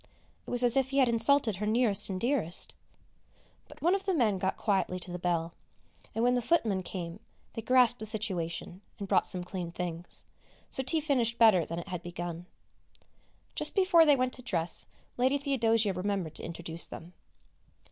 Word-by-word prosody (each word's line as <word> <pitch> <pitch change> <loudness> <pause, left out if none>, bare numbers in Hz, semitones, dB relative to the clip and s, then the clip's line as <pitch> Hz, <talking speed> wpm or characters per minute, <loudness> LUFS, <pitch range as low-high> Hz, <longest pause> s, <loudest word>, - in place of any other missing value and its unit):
It - - -7
was 245 0 +2
as 245 0 +4
if 265 -1 +1
he 275 - -2
had 265 -2 +5
insulted 230 -2 +3
her 210 +2 -3
nearest 215 -2 +3
and 185 -1 -3
dearest! 235 - -1 0.9
But - - -15
one 345 +3 +4
of 390 0 -1
the 380 -2 +1
men 215 - +1
got 190 +1 -1
quietly 190 -3 0
to 180 0 -6
the 180 - -5
bell, 170 -1 -1 0.6
and 225 - 0
when 245 +1 +3
the 250 - +1
footmen 225 - +1
came 175 0 -6 0.3
they 225 - -5
grasped 245 +1 +3
the 220 - -4
situation 190 -4 -2 0.2
and 200 - -6
brought 190 -2 +2
some 180 -1 +1
clean 180 -2 -6
things, 175 0 -5 0.5
so - - -1
tea 315 +4 +1
finished 245 -6 +1
better 210 -9 +5
than 165 - -5
it 170 +3 -7
had 180 -2 -4
begun. 175 -1 -6 1.1
Just - - 0
before 370 -5 +5
they 290 - +6
went 255 -1 -1
to 255 - -1
dress 170 -8 +1 0.3
Lady 260 +3 +2
Theodosia 230 -7 +1
remembered 185 -3 -3
to - - -8
introduce 170 0 -5
them. 170 +2 -10
210 Hz, 185 wpm, -29 LUFS, 180-250 Hz, 1.1 s, they